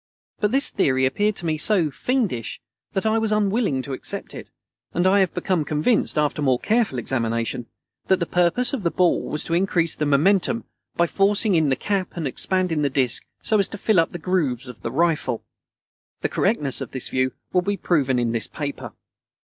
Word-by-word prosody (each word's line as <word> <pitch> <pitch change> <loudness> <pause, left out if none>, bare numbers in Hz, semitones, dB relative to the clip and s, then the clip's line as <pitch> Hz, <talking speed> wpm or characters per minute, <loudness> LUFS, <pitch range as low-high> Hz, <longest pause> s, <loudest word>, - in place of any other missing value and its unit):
But 210 - +2
this 270 +5 +1
theory 130 -8 +2
appeared 205 +11 +1
to 175 - -5
me 155 -2 0
so 175 -5 +3
"fiendish" 210 - -2 0.3
that 190 - -1
I 220 +1 +2
was 220 -1 -1
unwilling 205 - +1
to 140 - -5
accept - - -5
it, - - -9 0.5
and 175 - +1
I 195 +1 +5
became 180 -3 -1
convinced, 155 +7 +1
after 150 0 +1
more 130 -3 +3
careful 220 - +1
examination, 115 -1 -2 0.4
that 190 - +4
the 170 - 0
purpose 180 +10 +2
of 265 - -2
the 170 - +1
ball 180 +1 +2
was 150 - -3
to 165 - -4
increase 170 -2 +1
the 150 - -1
momentum, 195 +10 +2 0.3
by 170 - +3
forcing 200 +3 +2
in 160 -4 +3
the 130 - +2
cap 195 - -2
and 165 - -2
expanding 175 +3 0
the 145 - +1
disc 130 -2 +1 0.2
so 215 - +2
as 195 - +3
to - - -8
fill 205 -2 +2
up 165 - +2
the - - -6
grooves 150 -8 -1
of 125 -2 -10
the 115 - -4
rifle. 160 -5 0 0.8
The - - 0
correctness 150 - 0
of - - -5
this 130 - -2
view 130 -1 0 0.2
will 180 - +4
be 200 +2 -2
proven 135 -9 +1
in 120 -1 0
this 115 -1 -1
paper. 145 -2 -6
170 Hz, 200 wpm, -23 LUFS, 135-200 Hz, 0.8 s, I